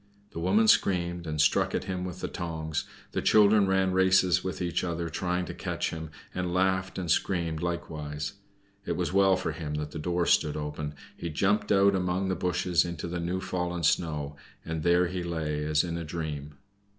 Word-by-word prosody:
The - - -6
woman 100 +6 +3
screamed, 85 -4 +2
and 75 -1 -3
struck 75 - +3
at - - -1
him 90 -1 -3
with 90 -2 -6
the - - -2
tongs, 80 -3 -3 0.3
the - - -1
children 105 -1 +5
ran 95 0 +2
races 95 -1 +4
with 95 -4 -4
each 85 -2 -1
other 85 -1 -2
trying 90 +1 -1
to - - -6
catch - - -3
him, 80 -1 -6 0.2
and 90 -1 -2
laughed 95 +1 +1
and 90 -4 -1
screamed 85 -3 0
likewise. 75 -4 -4 0.5
It - - -2
was - - -2
well 95 -1 +5
for - - -2
him 75 -1 -5
that 75 0 -4
the 80 - -5
door 85 +2 0
stood 75 -3 +2
open. 75 0 -4 0.2
He 85 - -5
jumped 95 +7 +1
out 100 0 +5
among 95 0 0
the 95 - +1
bushes 90 -1 +1
into 85 -1 -5
the 85 0 -3
new 90 +2 -1
fallen 90 -2 -3
snow, 75 -2 0 0.3
and 80 -1 -3
there 85 +2 +4
he 90 +1 -3
lay 80 -3 -2
as 75 0 +2
in 85 -1 -3
a - - -4
dream. 75 -3 -5
85 Hz, 195 wpm, -28 LUFS, 80-95 Hz, 0.5 s, children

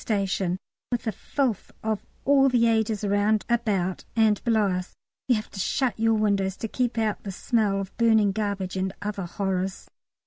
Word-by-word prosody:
station, 195 -4 0 0.3
with 240 -1 -1
the 220 - -1
filth 240 +1 -2
of 220 -2 -1 0.2
all 275 -1 +5
the 240 -2 +3
ages 220 -2 +1
around, 205 +1 +2
about, 205 -6 0
and 220 -2 +3
below 220 -3 +3
us. 180 0 -4 0.3
You 250 - +4
have 215 - -4
to 195 - -8
shut 240 +2 0
your 225 0 +3
window 200 -3 +2
to 195 +4 -5
keep 245 +1 -1
out 220 -2 0
the 200 - -5
smell 205 0 +1
of 195 -1 -6
burning 220 -3 +4
garbage 200 -3 -2
and 190 0 -1
other 205 -2 -3
horrors. 190 0 -3
210 Hz, 175 wpm, -26 LUFS, 195-225 Hz, 0.3 s, all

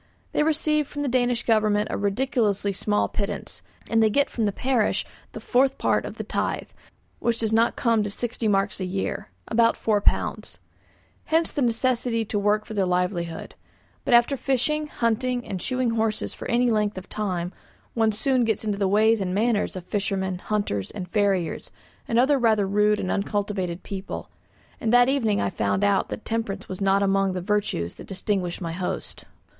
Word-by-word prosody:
They - - +1
receive 305 -1 +1
from 290 0 -4
the - - -1
Danish 245 -1 +1
Government 215 -2 +2
a - - -1
ridiculously 205 -1 0
small 205 +2 +1
pittance, 200 -1 -4 0.3
and 225 0 +2
they 220 - +5
get 280 +6 +1
from 225 - -1
the 205 - +1
parish 250 0 0 0.3
the - - -6
fourth 260 +2 +2
part - - +1
of - - -6
the - - -5
tithe, - - -2 0.5
which 235 -1 0
does 220 -1 -1
not 230 +1 +3
come 230 -2 +2
to 205 - -1
sixty 230 +2 -2
marks 200 0 +1
a 185 - -2
year 190 +1 -3 0.2
(about 230 0 +3
£4). 210 -2 0 0.7
Hence 325 +1 +2
the 290 - -2
necessity 235 -1 +1
to 205 0 -1
work 210 +1 +1
for 220 - -8
their 195 -3 +1
livelihood; 180 -2 -2 0.5
but 245 - +4
after 240 +4 +4
fishing, 285 +4 0
hunting, 245 -1 -1
and 185 -2 -4
shoeing 255 -2 0
horses 225 -1 -1
for - - -7
any 240 0 +3
length 210 -2 0
of 185 - -7
time, 185 -4 -3 0.4
one 225 -2 +2
soon 250 +4 +1
gets 220 -1 0
into 205 -2 -1
the 195 - +2
ways 215 +2 +3
and 185 -1 -1
manners 215 -1 +1
of 180 -2 -6
fishermen, 190 -2 -2
hunters, 190 - -2
and 185 -4 -7
farriers, 195 -5 0 0.4
and 230 - 0
other 270 +3 +4
rather 220 -4 +3
rude 210 +1 +3
and 185 - -2
uncultivated 200 -3 -2
people; 195 -1 -6 0.5
and 220 - 0
that 245 +1 +6
evening 230 -7 +1
I 100 - 0
found 100 -2 0
out 100 - +2
that 105 - -6
temperance 215 -3 -3
was 185 +1 -6
not 195 0 +3
among 195 -1 +2
the 185 - -2
virtues 200 - -1
that - - -11
distinguished 190 -2 -2
my 165 -2 -3
host. 180 +2 -5
210 Hz, 180 wpm, -25 LUFS, 195-235 Hz, 0.7 s, that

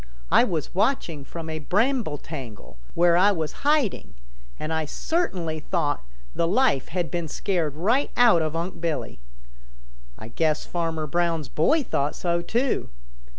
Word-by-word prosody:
I - - +7
was 165 - -2
watching 180 - 0
from 165 +3 -7
a 160 0 -4
bramble 210 - +1
tangle 130 - -9 0.2
where 170 0 +5
I 195 +4 +5
was 160 -5 -2
hiding, 285 - +1 0.4
and 155 +1 -3
I 160 -1 0
certainly 180 - -2
thought 145 - -1 0.3
the 165 - +1
life 200 - +2
had 175 -3 -2
been 170 -2 -2
scared 160 -2 -1
right 230 - +1
out 235 -9 +6
of 155 0 -2
Unc' 170 +1 -4
Billy. 165 - -3 1.0
I 110 - -9
guess 155 +4 0
Farmer 165 -2 -2
Brown's 165 -1 0
boy 290 - +2
thought 145 - -1
so 170 -1 0
too. 240 - 0
170 Hz, 150 wpm, -25 LUFS, 155-200 Hz, 1.0 s, I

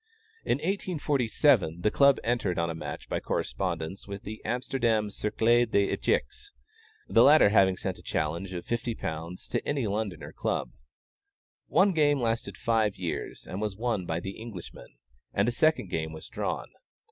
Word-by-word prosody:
In - - +1
1847, 145 - +1
the 105 - +2
Club 140 -1 +5
entered 115 -7 0
on 85 0 0
a - - -3
match 80 - -6
by - - -1
correspondence 90 0 -3
with 100 +1 -7
the 110 -1 -7
Amsterdam 120 -4 0
Cercle 115 +4 +2
des 100 -2 +2
Echecs, 410 -1 -1 0.6
the - - +5
latter 150 -6 +7
having 95 -3 +4
sent - - -4
a - - -13
challenge 85 +5 -2
of 90 -2 -5
£50 90 -8 -4
to - - -2
any 140 -4 0
London 100 -5 -2
club. - - -2 1.0
One 195 +1 +4
game 145 -4 +3
lasted 115 -1 -1
five 110 -3 +1
years, 90 -3 -4
and 95 - -5
was 105 -3 -2
won 110 -6 -1
by 80 +1 -1
the 95 +4 -7
Englishmen, 105 -7 -9 0.5
and 100 +3 +3
a - - +3
second 140 - +2
game 80 -2 -2
was 80 - -9
drawn. - - -3
105 Hz, 160 wpm, -28 LUFS, 90-120 Hz, 1.0 s, latter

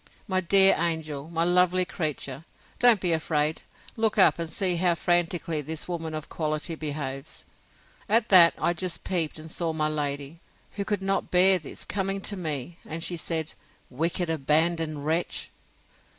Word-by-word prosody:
—My 185 -2 0
dear 195 +2 +5
angel, 160 -3 -3
my 165 0 0
lovely 180 +1 +3
creature, 150 -5 -4 0.4
don't 240 -4 +6
be 180 -2 +1
afraid; 155 -1 0 0.3
look 220 -2 0
up, 190 - +5
and 165 -1 -4
see 180 +1 0
how 175 0 +2
frantickly 170 -2 0
this 160 +2 -5
woman 165 -3 -4
of 155 -1 -6
quality 155 +1 -2
behaves. 145 -3 -6 0.6
At 225 +2 +3
that, 175 -3 +8
I 175 - +1
just 175 -1 -3
peeped, 165 -5 -1
and 155 0 -9
saw 165 -2 -2
my 155 -1 0
lady, 145 +1 -4 0.3
who 200 - -4
could 205 -2 -2
not 195 0 -1
bear 185 +1 +5
this, 155 - -8
coming 195 0 -1
to 205 - 0
me; 160 -2 -5
and 165 +1 -5
she 175 - -1
said, 160 -1 -2 0.4
Wicked 170 +6 -1
abandoned 155 0 0
wretch! 165 +3 -2
165 Hz, 160 wpm, -26 LUFS, 155-180 Hz, 0.6 s, that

